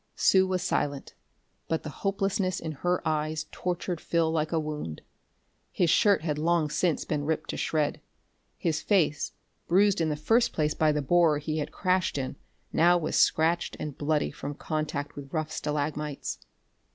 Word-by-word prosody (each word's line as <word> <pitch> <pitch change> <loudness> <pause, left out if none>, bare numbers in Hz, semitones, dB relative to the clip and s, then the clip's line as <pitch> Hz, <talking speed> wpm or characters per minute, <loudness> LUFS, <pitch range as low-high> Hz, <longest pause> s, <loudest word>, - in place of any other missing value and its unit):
Sue 190 -1 +4
was 185 -1 -1
silent, 145 -4 -1 0.5
but 160 - -1
the 155 - -5
hopelessness 195 -2 0
in 160 - -4
her 175 +5 -1
eyes 155 0 -1
tortured 180 -1 -3
Phil 165 -1 +1
like 155 -1 0
a 165 - +2
wound. 150 - -5 0.7
His 170 -3 +2
shirt 200 -6 +4
had 150 -3 -1
long 160 -1 +1
since 170 -2 +1
been 150 -2 -1
ripped 160 +2 -1
to - - -5
shreds; 150 -2 0 0.6
his 160 -3 -1
face, 165 -8 +1 0.3
bruised 195 +1 +4
in 160 - +1
the 150 - 0
first 225 +11 +2
place 150 -1 +1
by 155 -1 +3
the 150 -1 -1
borer 165 0 +4
he 155 +1 -2
had 150 - -3
crashed 185 -4 0
in, 135 0 -3 0.4
now 175 +2 +5
was 160 -3 -2
scratched 165 +2 +2
and 150 -3 -5
bloody 150 0 0
from 145 +1 -6
contact 150 -2 -3
with 140 -1 -9
rough 155 -1 -2
stalagmites. 150 -1 -3
155 Hz, 165 wpm, -28 LUFS, 150-175 Hz, 0.7 s, now